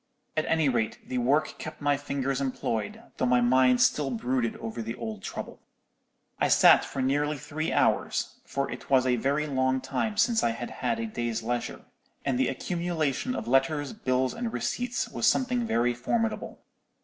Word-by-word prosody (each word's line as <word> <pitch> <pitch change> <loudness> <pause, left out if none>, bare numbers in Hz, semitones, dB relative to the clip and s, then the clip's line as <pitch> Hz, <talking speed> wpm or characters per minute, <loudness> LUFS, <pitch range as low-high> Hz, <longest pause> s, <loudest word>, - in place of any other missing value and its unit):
At 155 - +1
any 160 -2 +2
rate, 120 -4 0
the 125 - -1
work 140 +6 +1
kept 155 - -7
my 145 -1 +2
fingers 135 -1 -2
employed, 115 -5 -3
though 130 - +1
my 125 0 +4
mind 125 +1 +4
still 145 -2 +2
brooded 125 -1 -1
over 115 +1 -5
the 115 +1 -4
old 110 -4 -6
trouble. - - -7 0.8
"I - - +3
sat - - +7
for 135 - -3
nearly 145 +3 +1
three 145 +2 -3
hours; - - +1
for 140 0 -3
it 125 - -8
was 130 -2 +4
a 125 -1 +3
very 140 +5 0
long 130 -2 +1
time 205 +11 -2
since 230 0 +3
I 115 - +2
had 120 +1 -6
had 230 -1 -2
a 230 - -2
day's 120 - -3
leisure, 120 +1 -3 0.4
and 130 -3 0
the 130 - +3
accumulation 170 - -1
of - - -4
letters, 140 - +1
bills, 130 - 0
and 235 -1 -3
receipts 245 +1 -2
was - - -1
something 250 -2 +2
very 120 - +2
formidable. 225 - -2
135 Hz, 175 wpm, -28 LUFS, 125-155 Hz, 0.8 s, sat